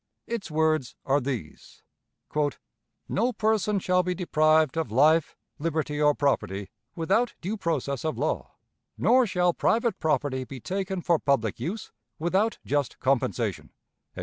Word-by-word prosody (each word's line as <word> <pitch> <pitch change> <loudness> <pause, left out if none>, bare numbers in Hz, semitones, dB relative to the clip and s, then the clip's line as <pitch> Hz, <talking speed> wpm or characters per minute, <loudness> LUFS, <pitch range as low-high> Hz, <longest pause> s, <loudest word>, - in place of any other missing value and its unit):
Its 230 -5 -4
words 155 -4 +1
are 140 +1 +2
these: 120 - -6 1.2
"No 235 +5 +1
person 215 -2 +1
shall 180 -1 +2
be 180 0 -2
deprived 155 -2 +3
of 160 -9 -2
life, 155 +6 +3 0.2
liberty, 150 -1 -1
or 150 -1 +4
property 100 -9 -1 0.2
without 195 +9 +1
due 195 +6 -3
process 145 - -2
of 155 -1 -2
law; - - -2 0.4
nor 255 -1 +4
shall 180 -1 +2
private 230 +5 +1
property 140 -3 0
be 130 +1 -9
taken 190 - -3
for 170 -3 +3
public 115 -8 0
use 190 - -4 0.3
without 190 +7 +1
just 145 -2 -1
compensation." 120 -6 0
160 Hz, 130 wpm, -27 LUFS, 140-190 Hz, 1.2 s, or